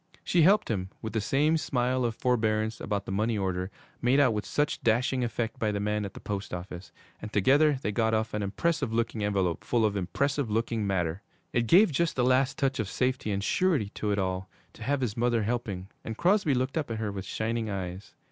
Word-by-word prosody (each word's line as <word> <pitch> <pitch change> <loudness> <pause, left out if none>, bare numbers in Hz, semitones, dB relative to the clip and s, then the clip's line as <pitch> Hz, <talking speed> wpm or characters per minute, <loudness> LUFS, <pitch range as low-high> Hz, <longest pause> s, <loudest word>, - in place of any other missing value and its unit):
She 175 - +2
helped 190 - +4
him, 95 -3 -2
with 110 -1 -4
the 110 - 0
same 145 +9 +2
smile 125 -3 0
of 115 -2 -1
forbearance, 110 -3 0
about 100 -1 -2
the - - -5
money 110 +3 0
order, 95 -1 -1 0.3
made 125 +3 +3
out 130 -5 +4
with 105 0 -3
such 150 0 0
dashing 125 +3 +2
effect 115 -1 -3
by 110 -1 +1
the 100 - -2
man 105 0 -1
at 100 - -8
the - - -8
post 100 -3 -4
office, 90 0 -8 0.3
and 105 - -7
together 140 +8 +4
they 105 - 0
got 110 +1 +1
off 110 0 -1
an 105 - -1
impressive 130 +7 -1
looking 115 -1 -1
envelope 95 -5 0
full 115 -2 +2
of 105 -1 0
impressive 135 +8 -1
looking 110 -1 -1
matter. 90 -2 -1 0.3
It 120 -1 +1
gave 185 - +6
just 170 +3 0
the 125 - +2
last 130 +1 +2
touch 135 -2 0
of 105 -3 -1
safety 130 -3 -1
and 100 0 -1
surety 160 - +1
to 105 - -4
it 100 - +1
all 95 -1 -2 0.2
to - - -16
have 135 +4 0
his 115 -5 -1
mother 120 -1 +1
helping, 105 -5 -3 0.2
and 110 0 -5
Crosby 180 -6 +3
looked 130 +5 0
up 145 - -4
at 115 - -3
her 110 -2 -2
with 95 -1 -5
shining 110 +2 -2
eyes. 95 -1 -5
110 Hz, 220 wpm, -28 LUFS, 100-130 Hz, 0.3 s, gave